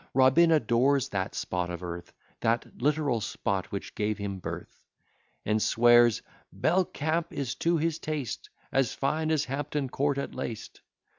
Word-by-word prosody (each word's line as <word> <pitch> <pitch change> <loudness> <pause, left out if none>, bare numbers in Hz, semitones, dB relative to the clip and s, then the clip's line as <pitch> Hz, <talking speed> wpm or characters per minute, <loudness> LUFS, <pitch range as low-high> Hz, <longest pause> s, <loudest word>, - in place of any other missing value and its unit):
Robin 135 +6 +6
adores 135 -1 +3
that 95 -1 -2
spot 90 -1 -2
of 90 0 -6
earth, 85 0 -6 0.3
That 115 +1 -1
literal 145 -4 +1
spot 100 -1 -2
which 100 - -5
gave 105 0 -1
him 100 -2 -4
birth; - - -7 0.6
And 105 +1 +1
swears, 120 0 +5 0.3
"Belcamp 170 -2 0
is, 135 -3 -3
to 170 0 +3
his 160 0 0
taste, 150 -6 -4 0.2
As 135 -4 +1
fine 155 +3 0
as 155 -2 +2
Hampton 140 0 -2
court 140 0 0
at 140 - -3
least." 120 -4 -6
130 Hz, 145 wpm, -28 LUFS, 110-150 Hz, 0.6 s, Robin